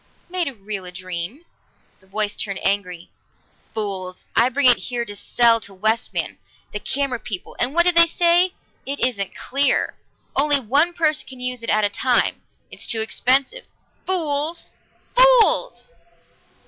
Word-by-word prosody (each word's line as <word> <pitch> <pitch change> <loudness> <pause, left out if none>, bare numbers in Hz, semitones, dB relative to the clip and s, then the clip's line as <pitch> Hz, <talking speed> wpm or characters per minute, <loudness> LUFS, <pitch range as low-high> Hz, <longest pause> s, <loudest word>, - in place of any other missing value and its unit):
"Made 360 -2 -1
real 200 -1 -6
a 180 - -8
dream." 185 - -7 0.5
The 190 - -26
voice 210 +1 0
turned 200 -3 -5
angry. 185 -3 -2 0.6
"Fools! 190 -4 -4
I 235 +2 +4
bring 280 +2 -1
it 245 - +6
here 240 -1 -3
to 205 -2 -8
sell 230 +3 +2
to 200 -2 -8
Westman, 220 +4 -2 0.3
the 210 - -5
camera 260 +2 -2
people, 190 -5 -7
and 255 +5 +1
what 345 0 +4
do 355 - +5
they 335 -1 +6
say? 350 +2 +2 0.3
'It 280 +1 -4
isn't 205 -6 -2
clear. 280 +2 0 0.4
Only 290 0 +4
one 285 +8 +1
person 310 -3 0
can 260 -1 -10
use 250 -1 -3
it 230 - -5
at 215 0 +2
a - - +1
time. 245 +3 0 0.3
It's - - -4
too 225 - +2
expensive.' 265 - +1 0.4
Fools! 325 -2 +3 0.4
Fools!" - - +4
245 Hz, 150 wpm, -21 LUFS, 205-300 Hz, 0.6 s, it